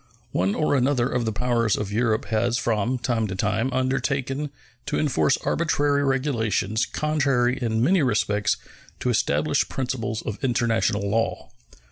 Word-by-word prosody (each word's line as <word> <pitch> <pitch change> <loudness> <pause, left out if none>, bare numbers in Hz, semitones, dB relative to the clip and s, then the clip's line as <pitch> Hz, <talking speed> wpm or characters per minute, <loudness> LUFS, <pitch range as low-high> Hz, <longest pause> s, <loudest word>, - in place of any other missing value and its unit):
One 95 +3 +1
or 155 - +1
another 130 -2 +2
of 125 -2 -1
the 110 - 0
powers 115 -1 +1
of 100 -1 -4
Europe 110 0 +1
has 115 +2 0
from 115 +2 0
time 120 -3 -1
to 95 - -4
time 110 +6 0
undertaken 135 +2 -1 0.4
to - - -1
enforce 100 - +2
arbitrary 145 -3 +1
regulations 120 -6 0
contrary 140 -5 +1
in 115 -1 0
many 180 +5 +4
respects 105 -5 +1 0.4
to - - 0
established - - +1
principles 125 -4 -3
of 110 +6 -6
international 115 -5 +1
law. 115 +3 -1
120 Hz, 140 wpm, -24 LUFS, 110-135 Hz, 0.4 s, many